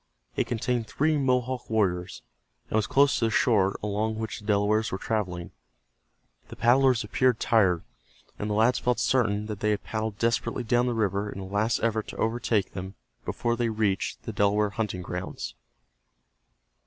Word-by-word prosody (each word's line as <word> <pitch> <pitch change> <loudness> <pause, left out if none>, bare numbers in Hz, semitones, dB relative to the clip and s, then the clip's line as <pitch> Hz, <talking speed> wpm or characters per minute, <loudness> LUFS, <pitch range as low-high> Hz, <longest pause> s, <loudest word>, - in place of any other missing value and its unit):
It - - 0
contained 120 0 -1
three 155 +2 +1
Mohawk 130 -2 0
warriors, 95 -5 0 0.5
and - - 0
was 110 -1 +2
close 140 +1 +4
to 115 - +2
the - - +2
shore 105 -4 +2
along 105 +1 -1
which 110 0 -4
the 105 - -14
Delawares 105 +1 +2
were 95 - -2
traveling. 95 -6 -3 1.0
The - - -10
paddlers 125 0 +4
appeared 125 +3 +1
tired, 95 -7 +3 0.6
and 105 - -2
the 105 - 0
lads 115 +4 +3
felt 125 0 +1
certain 105 -5 +1
that 105 -2 -5
they 105 - +1
had 105 - 0
paddled 110 -2 -3
desperately 115 +1 0
down 120 +2 +2
the 120 - 0
river 100 -1 0
in 100 - -7
a 95 - -6
last 105 +4 0
effort 110 -2 0
to - - -8
overtake 115 -2 0
them 95 +1 -6 0.3
before 120 0 -1
they 120 -1 0
reached 105 -3 -1
the - - -5
Delaware 100 +1 +2
hunting 100 -4 -3
grounds. 90 +1 -5
110 Hz, 170 wpm, -27 LUFS, 100-120 Hz, 1.0 s, close